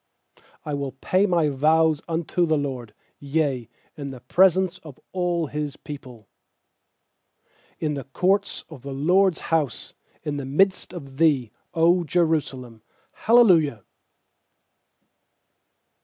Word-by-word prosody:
18I 145 Hz, -1 st, -2 dB
will 140 Hz, -1 st, -3 dB
pay 185 Hz, +9 st, +1 dB
my 170 Hz, -5 st, +2 dB
vows 155 Hz, +2 st, +2 dB
unto 170 Hz, +1 st, 0 dB
the 155 Hz, -1 st, +2 dB
LORD, 130 Hz, -6 st, -5 dB, 0.2 s
Yea, 140 Hz, -5 st, -1 dB, 0.3 s
in 145 Hz, -2 st, -6 dB
the 135 Hz, -2 st, -8 dB
presence 185 Hz, +6 st, +3 dB
of 150 Hz, -5 st, -13 dB
all 175 Hz, -2 st, 0 dB
His 150 Hz, -1 st, -4 dB
people; 125 Hz, -6 st, -10 dB, 1.5 s
19In 150 Hz, -1 st, -1 dB
the 140 Hz, -2 st, -4 dB
courts 190 Hz, +8 st, 0 dB
of 155 Hz, -6 st, -12 dB
the 140 Hz, +1 st, -7 dB
LORD'S 180 Hz, +6 st, +2 dB
house, 150 Hz, -6 st, -1 dB, 0.3 s
In 150 Hz, -2 st, -3 dB
the 140 Hz, -, -4 dB
midst 190 Hz, +8 st, +1 dB
of 140 Hz, -6 st, -10 dB
thee, 140 Hz, -8 st, +2 dB, 0.2 s
0 170 Hz, +2 st, +3 dB
Jerusalem. 140 Hz, -9 st, -1 dB, 0.3 s
Hallelujah. 175 Hz, -, +4 dB
150 Hz, 115 wpm, -24 LUFS, 135-175 Hz, 1.5 s, Hallelujah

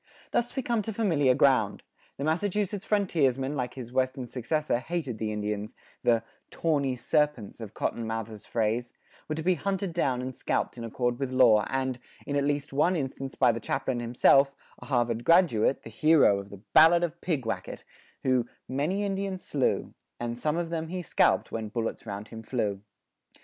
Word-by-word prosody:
[46:1] -, -, -46 dB
Thus 240 Hz, 0 st, 0 dB
we 265 Hz, -, -1 dB
come 235 Hz, -2 st, +1 dB
to 220 Hz, +2 st, -4 dB
familiar 160 Hz, -, +3 dB
ground: 130 Hz, -7 st, +3 dB, 0.3 s
the 140 Hz, -, -4 dB
Massachusetts 195 Hz, +5 st, 0 dB
frontiersman 145 Hz, -, +1 dB
like 125 Hz, -3 st, -3 dB
his 125 Hz, -3 st, -7 dB
western 130 Hz, 0 st, 0 dB
successor 130 Hz, +3 st, -1 dB
hated 140 Hz, -5 st, -4 dB
the 110 Hz, -1 st, -2 dB
Indians; 105 Hz, 0 st, -3 dB, 0.3 s
the 115 Hz, -1 st, +3 dB, 0.3 s
"tawney 140 Hz, -5 st, 0 dB
serpents," 130 Hz, -4 st, 0 dB
of 110 Hz, -2 st, -8 dB
Cotton 115 Hz, -1 st, -2 dB
Mather's 115 Hz, -1 st, -5 dB
phrase, 115 Hz, +2 st, -1 dB, 0.4 s
were 155 Hz, -, -1 dB
to 160 Hz, -, -4 dB
be 185 Hz, +2 st, +4 dB
hunted 190 Hz, +2 st, -2 dB
down 130 Hz, -7 st, 0 dB
and 130 Hz, 0 st, -4 dB
scalped -, -, -1 dB
in 120 Hz, -, -7 dB
accord 120 Hz, +2 st, -1 dB
with 135 Hz, -2 st, -1 dB
law 120 Hz, -5 st, +5 dB
and, 130 Hz, -1 st, -1 dB, 0.3 s
in 145 Hz, -, -3 dB
at 140 Hz, -1 st, +2 dB
least 145 Hz, -1 st, -1 dB
one 160 Hz, +6 st, +3 dB
instance 135 Hz, -3 st, -4 dB
by 125 Hz, -3 st, +4 dB
the 115 Hz, -, -4 dB
chaplain 130 Hz, +1 st, -2 dB
himself, 135 Hz, +3 st, +4 dB, 0.2 s
a -, -, -11 dB
Harvard 120 Hz, -3 st, 0 dB
graduate, 140 Hz, -, +4 dB
the 115 Hz, -, -9 dB
hero 140 Hz, -5 st, +4 dB
of 100 Hz, 0 st, -9 dB
the 100 Hz, 0 st, -12 dB
Ballad 165 Hz, +2 st, +7 dB
of 170 Hz, 0 st, -3 dB
Pigwacket, 135 Hz, -10 st, -3 dB, 0.4 s
who 130 Hz, -2 st, +2 dB, 0.2 s
many 155 Hz, +10 st, -1 dB
Indians 195 Hz, -1 st, -3 dB
slew, 140 Hz, -3 st, 0 dB, 0.3 s
And 120 Hz, 0 st, -3 dB
some 150 Hz, +6 st, -1 dB
of 170 Hz, -1 st, -2 dB
them 165 Hz, -1 st, -2 dB
he 180 Hz, +2 st, -4 dB
scalp'd -, -, +2 dB
when 110 Hz, -1 st, -4 dB
bullets 115 Hz, 0 st, -3 dB
round 100 Hz, +1 st, -6 dB
him 110 Hz, -, -8 dB
flew. 105 Hz, -4 st, -2 dB
135 Hz, 180 wpm, -28 LUFS, 115-160 Hz, 0.4 s, Ballad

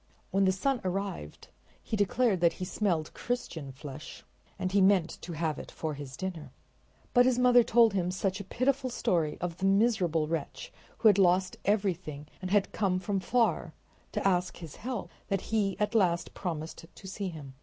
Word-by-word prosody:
When 195 Hz, +1 st, +3 dB
the 190 Hz, -, +4 dB
sun 245 Hz, +6 st, 0 dB
arrived 185 Hz, -, -4 dB, 0.3 s
he -, -, -4 dB
declared 205 Hz, -1 st, +2 dB
that 170 Hz, -1 st, +4 dB
he 185 Hz, -, -5 dB
smelled 175 Hz, -5 st, -1 dB
Christian 170 Hz, -, -4 dB
flesh 135 Hz, +2 st, -9 dB, 0.3 s
and 185 Hz, -, -2 dB
he 200 Hz, 0 st, +4 dB
meant 190 Hz, -3 st, +3 dB
to 175 Hz, -, -6 dB
have 160 Hz, -1 st, -1 dB
it -, -, -8 dB
for 155 Hz, -1 st, -4 dB
his 140 Hz, -2 st, -8 dB
dinner. 185 Hz, -5 st, -5 dB, 0.6 s
But 245 Hz, 0 st, +6 dB
his 255 Hz, -2 st, +2 dB
mother 250 Hz, -1 st, +6 dB
told 230 Hz, -1 st, +4 dB
him 180 Hz, -2 st, 0 dB
such 190 Hz, +1 st, -1 dB
a -, -, -5 dB
pitiful 260 Hz, +6 st, 0 dB
story 165 Hz, -9 st, 0 dB
of 175 Hz, -1 st, -3 dB
the 190 Hz, -, 0 dB
miserable 195 Hz, -6 st, +3 dB
wretch 165 Hz, -, -4 dB, 0.2 s
who 225 Hz, -, +4 dB
had 205 Hz, -2 st, +6 dB
lost 185 Hz, 0 st, +3 dB
everything 185 Hz, -8 st, 0 dB, 0.2 s
and 185 Hz, -, -4 dB
had 205 Hz, 0 st, +2 dB
come 190 Hz, -3 st, +1 dB
from 195 Hz, +2 st, -1 dB
far 235 Hz, +4 st, +1 dB, 0.4 s
to -, -, +1 dB
ask 180 Hz, -1 st, +1 dB
his 165 Hz, -5 st, -9 dB
help 245 Hz, -3 st, -5 dB, 0.2 s
that 195 Hz, +2 st, -3 dB, 0.3 s
at 210 Hz, +2 st, 0 dB
last 175 Hz, -5 st, +2 dB
he -, -, -27 dB
promised 165 Hz, -2 st, -5 dB
to 195 Hz, -, -11 dB
see 195 Hz, 0 st, -4 dB
him. 145 Hz, -5 st, -9 dB
190 Hz, 185 wpm, -30 LUFS, 170-210 Hz, 0.6 s, But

